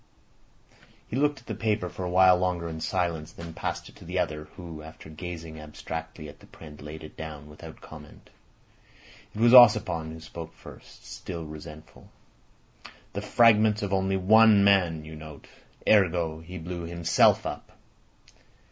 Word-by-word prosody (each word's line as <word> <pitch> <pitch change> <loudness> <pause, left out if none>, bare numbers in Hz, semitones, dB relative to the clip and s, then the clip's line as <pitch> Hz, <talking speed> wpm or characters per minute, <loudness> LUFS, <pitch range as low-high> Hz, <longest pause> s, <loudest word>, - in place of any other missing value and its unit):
He - - -5
looked 145 0 +1
at - - -26
the - - -5
paper 105 -4 -1
for 90 - -7
a 90 - -3
while 90 0 +6
longer 90 -2 -1
in 80 -1 -6
silence, 85 -4 -2
then 85 -1 -10
passed - - -4
it - - -16
to - - -14
the 90 +2 -4
other, 75 -4 -2
who 85 -4 -9
after 80 0 -12
gazing 80 -1 -8
abstractedly 80 +1 -7
at 75 0 -13
the - - -18
print 75 -3 -13
laid 75 +2 -9
it 75 - -11
down 75 -2 -8
without 80 +2 -12
comment. 75 -1 -14 1.0
It - - -6
was 120 +1 +5
Ossipon 105 -10 +6
who 80 - -9
spoke 80 +1 -9
first—still 85 -3 -10
resentful. 75 -1 -12 1.0
"The - - -4
fragments 110 -2 +4
of 100 -1 -2
only 95 0 +1
one 105 +2 +6
man, 90 -6 +3
you 80 0 -9
note. 75 -1 -11 0.4
Ergo: 85 -6 +3
blew 85 0 -7
himself 85 0 +3
up. - - -7
85 Hz, 155 wpm, -27 LUFS, 80-95 Hz, 1.0 s, while